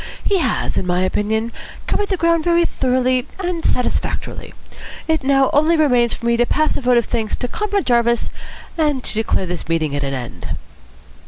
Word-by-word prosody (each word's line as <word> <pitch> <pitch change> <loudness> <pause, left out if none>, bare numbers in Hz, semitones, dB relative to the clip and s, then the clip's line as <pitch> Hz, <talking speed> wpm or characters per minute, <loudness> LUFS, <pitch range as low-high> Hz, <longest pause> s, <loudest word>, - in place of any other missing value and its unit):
He 395 -2 +2
has, 260 -9 -1
in 185 - -1
my 180 +1 +1
opinion, 220 +4 0 0.3
covered 410 - -1
the 380 - 0
ground 335 -1 +2
very 345 0 +3
thoroughly 255 -2 +1
and 355 -3 -3
satisfactorily. 250 - -2 0.6
It 320 -3 +1
now 270 0 +3
only 315 +3 +4
remains 250 -6 +3
for 235 - -9
me 235 0 +2
to 240 - +3
pass 310 +1 +1
a - - -2
vote 250 -1 +3
of 235 - +2
thanks 225 -3 -1
to 245 - -3
Comrade 405 - -1
Jarvis 235 -1 +2 0.5
and 295 -5 +1
to - - -4
declare 215 -3 0
this 175 -2 -5
meeting 160 -3 0
at 145 - -1
an 135 -1 -2
end." 125 -2 -5
250 Hz, 185 wpm, -19 LUFS, 220-315 Hz, 0.6 s, only